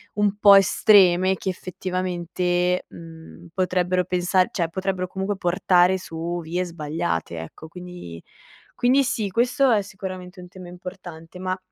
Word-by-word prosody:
un 205 -1 +1
po' 205 -1 +8
estreme 190 -2 +5
che 190 - -9
effettivamente, 180 -1 -2
mhmm, 165 +1 -12
potrebbero 180 0 +1
pensar 180 +1 +1
cioè 170 -4 -1
potrebbero 190 +1 -2
comunque 190 +2 -3
portare 180 0 +3
su 170 -1 -5
vie 175 +3 -2
sbagliate, 150 - -3
ecco. 80 - -10
Quindi 175 - -10 0.5
quindi 265 +3 +3
sì, 215 -4 -1
questo 245 +6 +2
è 215 -3 +3
sicuramente 185 -2 -8
un 180 - -12
tema 185 0 -11
importante, 180 -1 -10
ma 185 0 -2
180 Hz, 135 wpm, -23 LUFS, 175-190 Hz, 0.5 s, po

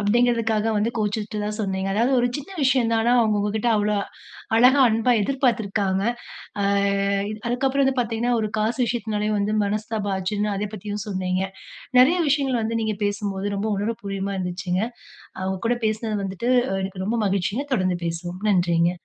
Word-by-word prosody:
அப்படீங்கிறதுக்காக 225 0 +2
வந்து 210 +3 +1
கோவிச்சுட்டதா 210 0 -2
சொன்னீங்க. 190 -1 -2
அதாவது 235 +5 +2
ஒரு 245 - +2
சின்ன 290 +6 -9
விஷயந்தான். 235 -4 +3
ஆனா, 240 +2 +3
அவங்க 215 -2 +2
உங்ககிட்ட 210 +3 0
அவ்வளோ 210 0 +1 0.6
அழகா, 255 +4 +6
அன்பா 225 +2 +2
எதிர்பார்த்திருக்காங்க. 210 -6 0 0.6
அ - - +1 0.8
அதுக்கப்பறம் 270 +3 +1
வந்து 265 0 +1
பாத்தீங்கன்னா, 235 +1 -1
ஒரு 215 -1 -2
காசு 220 +4 0
விஷயத்தினாலயும் 215 -2 -1
வந்து 205 +1 0
மனஸ்தாபாம் 210 0 -2
ஆச்சுன்னு, 205 +3 -1
அதை 205 +1 -2
பத்தியும் 205 0 -5
சொன்னீங்க. 185 -1 -1 0.6
நெறைய 320 +8 +5
விஷயங்கள் 270 -4 +1
வந்து 230 +1 -1
நீங்க 215 -2 -1
பேசும்போது 205 -1 -2
ரொம்ப 210 +2 -1
உணர்வுபூர்வமா 195 0 -3
இருந்துச்சுங்க. 180 +1 -2 0.6
அ - - -6
உங்க 190 -1 -3
கூட 245 - +1
பேசுனது 215 0 -2
வந்துட்டு, 195 +6 -3 0.3
எனக்கு 190 -1 -4
ரொம்ப 230 - 0
மகிழ்ச்சிங்க. 200 +7 -1
தொடர்ந்து 185 -5 +1
பேசுவோம். 175 +2 -4
நன்றிங்க. 175 -2 +3
210 Hz, 150 wpm, -23 LUFS, 195-230 Hz, 0.8 s, அழகா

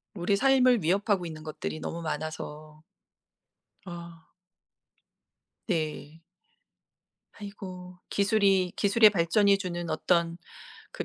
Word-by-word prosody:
우리 190 +2 +1
삶을 255 -4 +4
위협하고 195 +2 +1
있는 155 -2 -8
것들이 155 0 -5
너무 170 - -5
많아서. 155 0 -6 1.0
아. 170 -2 -10 1.4
네. 160 -2 -3 1.2
아이고. 185 -3 -9
기술이 195 -3 +2
기술의 215 +1 +5
발전이 200 +2 +3
주는 175 -3 -5
어떤 170 +1 0 0.5
그 - - -5
175 Hz, 200 characters per minute, -28 LUFS, 160-200 Hz, 1.4 s, 기술의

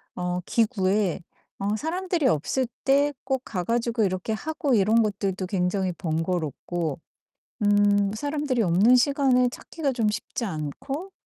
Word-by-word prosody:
어 180 0 -2
기구에 205 -6 +1 0.4
어 205 +2 0
사람들이 345 - -1
없을 225 - +1 0.2
때 280 +2 +4
꼭 265 -1 0
가 180 -4 -3
가지고 235 0 0
이렇게 185 +2 -1
하고 295 +4 -2
이런 220 +3 +4
것들도 195 -3 -1
굉장히 185 0 0
번거롭고 165 -2 -2 0.6
음 205 -1 +3
사람들이 290 0 -1
없는 195 +7 +5
시간을 255 -1 +3
찾기가 295 +1 -3
좀 230 -4 +1
쉽지 210 +3 -4
않고 205 - -5
210 Hz, 275 characters per minute, -25 LUFS, 185-265 Hz, 0.6 s, 없는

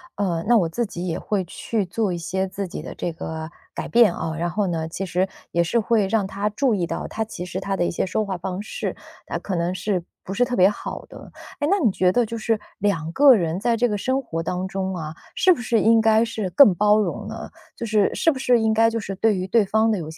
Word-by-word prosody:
呃， 175 -5 -1
那 240 0 +6
我 180 -6 +2
自 235 +9 -2
己 180 -3 -6
也 165 - -2
会 200 -3 -2
去 210 +4 -3
做 205 +2 -1
一 175 - -2
些 190 +3 -2
自 190 +1 -5
己 175 - -7
的 - - -7
这 175 - -4
个 160 -1 -6 0.2
改 - - -5
变 230 -6 +5
啊， 160 -1 -4
然 170 +1 -1
后 205 +2 0
呢， 165 -2 -2
其 195 +4 -4
实 185 +1 0 0.2
也 170 - +2
是 235 +8 +1
会 220 -2 +2
让 200 -1 +1
他 200 +2 -2
注 235 +2 +1
意 180 -3 0
到， 165 - -4
他 220 - -3
其 195 -5 -7
实 180 +1 -5
他 195 0 -2
的 175 - +1
一 - - -1
些 175 - -1
说 210 +4 -1
话 190 -2 -3
方 185 +2 -4
式， 215 - -4 0.3
啊， - - -3
可 195 - -4
能 170 +1 0
是 185 -1 -2 0.2
不 190 - -5
是 245 - +2
特 245 0 -2
别 185 +1 +6
好 210 - -6
的。 - - -12 0.3
诶， 290 - +2
那 400 - +3
你 255 -10 +3
觉 185 -2 +2
得 240 +5 +2
就 230 +1 -5
是 225 0 0 0.2
2 185 -6 0
个 280 +3 +7
人 170 -6 0
在 235 0 +1
这 245 +2 +3
个 210 -3 -1
生 260 +6 0
活 165 -10 -4
当 180 +3 -2
中 190 0 -3
啊， 160 -3 -5 0.2
是 370 - +5
不 295 - -6
是 240 -2 +1
应 225 +1 +5
该 220 +1 +4
是 220 -4 -3
更 205 -1 +6
包 210 +3 +4
容 210 - -2
呢？ - - -7 0.3
就 235 - -4
是 215 -2 +2
是 - - +2
不 290 - 0
是 250 -2 +3
应 220 -1 +2
该 225 +1 +4
就 230 0 -2
是 195 -2 -5
对 210 +1 +2
于 185 0 -3
对 220 +1 +3
方 220 +3 +2
的 215 - +1
有 160 -4 -5
些 160 - -10
200 Hz, 285 characters per minute, -23 LUFS, 180-225 Hz, 0.3 s, 个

